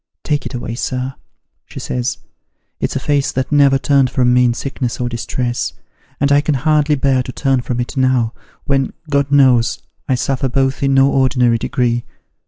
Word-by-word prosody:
Take 150 Hz, -3 st, -1 dB
it -, -, -7 dB
away, 120 Hz, -1 st, -5 dB
sir,' 130 Hz, +2 st, -3 dB, 0.5 s
she -, -, -9 dB
says, 125 Hz, 0 st, -3 dB, 0.3 s
' -, -, -52 dB
it's -, -, -1 dB
a -, -, 0 dB
face 145 Hz, -2 st, 0 dB
that 130 Hz, +2 st, -2 dB
never 140 Hz, -2 st, +5 dB
turned 135 Hz, 0 st, +2 dB
from 125 Hz, 0 st, +2 dB
me 125 Hz, 0 st, +4 dB
in 120 Hz, -1 st, +1 dB
sickness 130 Hz, -2 st, -4 dB
or 125 Hz, -, -1 dB
distress, 120 Hz, -1 st, -3 dB, 0.5 s
and 140 Hz, +1 st, +1 dB
I 145 Hz, 0 st, +5 dB
can 150 Hz, -1 st, 0 dB
hardly 150 Hz, +2 st, +2 dB
bear 135 Hz, -2 st, +1 dB
to 125 Hz, -, -6 dB
turn 135 Hz, -1 st, 0 dB
from 120 Hz, 0 st, -3 dB
it 120 Hz, -, -4 dB
now, 130 Hz, -3 st, +1 dB, 0.3 s
when, 135 Hz, -1 st, 0 dB, 0.2 s
God 140 Hz, 0 st, +1 dB
knows, 130 Hz, -4 st, +4 dB, 0.3 s
I 130 Hz, -, +3 dB
suffer 135 Hz, +1 st, -1 dB
both 135 Hz, +1 st, 0 dB
in 135 Hz, -1 st, +2 dB
no 135 Hz, +1 st, +5 dB
ordinary 125 Hz, -3 st, +2 dB
degree.' 120 Hz, 0 st, -1 dB
130 Hz, 190 wpm, -17 LUFS, 125-140 Hz, 0.5 s, never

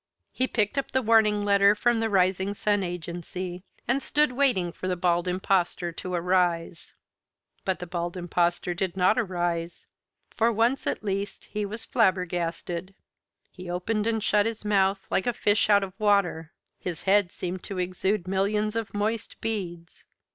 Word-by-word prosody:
He 255 Hz, -, 0 dB
picked 215 Hz, +3 st, 0 dB
up 275 Hz, -, -4 dB
the 260 Hz, -, +1 dB
warning 215 Hz, -2 st, +4 dB
letter 200 Hz, 0 st, +5 dB
from 240 Hz, +2 st, +2 dB
the 225 Hz, 0 st, 0 dB
Rising 190 Hz, 0 st, +2 dB
Sun 205 Hz, 0 st, +1 dB
Agency, 175 Hz, +1 st, -5 dB, 0.3 s
and 265 Hz, +3 st, +1 dB
stood 300 Hz, 0 st, +2 dB
waiting 245 Hz, -10 st, +1 dB
for 185 Hz, -, -6 dB
the 185 Hz, -, 0 dB
Bald 175 Hz, 0 st, +1 dB
Impostor 180 Hz, -1 st, 0 dB
to 180 Hz, +2 st, -6 dB
arise. 175 Hz, -1 st, 0 dB, 0.7 s
But 190 Hz, -1 st, 0 dB
the 180 Hz, -, -6 dB
Bald 175 Hz, 0 st, -4 dB
Impostor 175 Hz, 0 st, 0 dB
did 185 Hz, +1 st, -3 dB
not 185 Hz, +5 st, +4 dB
arise. 175 Hz, -5 st, -2 dB, 0.5 s
For 230 Hz, +1 st, +3 dB
once 235 Hz, +4 st, +1 dB
at -, -, -2 dB
least 200 Hz, 0 st, -3 dB
he 210 Hz, -1 st, -2 dB
was 215 Hz, +3 st, -6 dB
flabbergasted. 180 Hz, -3 st, -1 dB, 0.6 s
He 180 Hz, -1 st, -9 dB
opened 210 Hz, +5 st, -1 dB
and 225 Hz, -2 st, 0 dB
shut 210 Hz, 0 st, +3 dB
his 225 Hz, -1 st, -5 dB
mouth, 195 Hz, -1 st, +2 dB
like 190 Hz, -, +1 dB
a 245 Hz, -, +2 dB
fish 210 Hz, 0 st, +2 dB
out 200 Hz, -1 st, +5 dB
of 190 Hz, -1 st, -6 dB
water. 200 Hz, -6 st, +2 dB, 0.3 s
His 175 Hz, -3 st, -5 dB
head 195 Hz, -2 st, +3 dB
seemed 180 Hz, 0 st, -4 dB
to 195 Hz, -, -5 dB
exude 185 Hz, +1 st, -1 dB
millions 210 Hz, +3 st, 0 dB
of 225 Hz, -2 st, -3 dB
moist 215 Hz, +2 st, -2 dB
beads. 175 Hz, -7 st, -5 dB
190 Hz, 160 wpm, -26 LUFS, 180-210 Hz, 0.7 s, letter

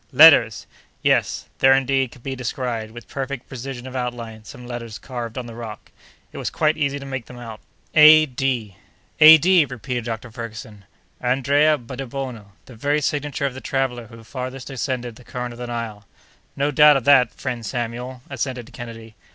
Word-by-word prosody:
"Letters!" 130 Hz, -9 st, +7 dB, 0.4 s
Yes; -, -, +1 dB
there, 135 Hz, 0 st, +6 dB
indeed, 135 Hz, -1 st, +1 dB
could 125 Hz, -, -16 dB
be 135 Hz, -1 st, -4 dB
descried, 125 Hz, -3 st, -3 dB
with 120 Hz, +1 st, -12 dB
perfect 135 Hz, -2 st, -5 dB
precision 130 Hz, -1 st, -7 dB
of 130 Hz, 0 st, -8 dB
outline, 120 Hz, -3 st, -5 dB
some 125 Hz, -, -11 dB
letters 115 Hz, -2 st, -6 dB
carved 120 Hz, -2 st, -7 dB
on 125 Hz, -, -4 dB
the 120 Hz, -, -9 dB
rock. 115 Hz, -2 st, -9 dB, 0.4 s
It -, -, -8 dB
was -, -, -2 dB
quite 155 Hz, +1 st, +1 dB
easy 140 Hz, -2 st, -1 dB
to 140 Hz, -, -8 dB
make 130 Hz, -3 st, -5 dB
them 125 Hz, -, -11 dB
out: 115 Hz, -3 st, -9 dB, 0.3 s
"A. 155 Hz, 0 st, +8 dB
D." 125 Hz, -7 st, -2 dB, 0.4 s
"A.D.!" 160 Hz, +2 st, +8 dB
repeated 125 Hz, -2 st, -5 dB
Dr. 115 Hz, 0 st, -5 dB
Ferguson. 110 Hz, -3 st, -9 dB, 0.4 s
"Andrea 140 Hz, +5 st, +3 dB
Debono—the 125 Hz, -3 st, -8 dB
very 145 Hz, +6 st, 0 dB
signature 145 Hz, -1 st, -2 dB
of 135 Hz, -, -1 dB
the 130 Hz, -, -9 dB
traveller 125 Hz, -2 st, -2 dB
who 115 Hz, -1 st, -13 dB
farthest 130 Hz, +2 st, -6 dB
ascended 125 Hz, -3 st, -3 dB
the 125 Hz, -, -15 dB
current 125 Hz, -1 st, -5 dB
of 120 Hz, -, -13 dB
the 125 Hz, -, -5 dB
Nile." 115 Hz, -4 st, -5 dB, 0.5 s
"No 140 Hz, +1 st, 0 dB
doubt 150 Hz, 0 st, +7 dB
of 135 Hz, -, -3 dB
that, 125 Hz, -4 st, +5 dB
friend 120 Hz, -2 st, -5 dB
Samuel," 120 Hz, +3 st, -5 dB
assented 130 Hz, -1 st, -5 dB
Kennedy. 115 Hz, -2 st, -9 dB
125 Hz, 170 wpm, -22 LUFS, 115-135 Hz, 0.5 s, A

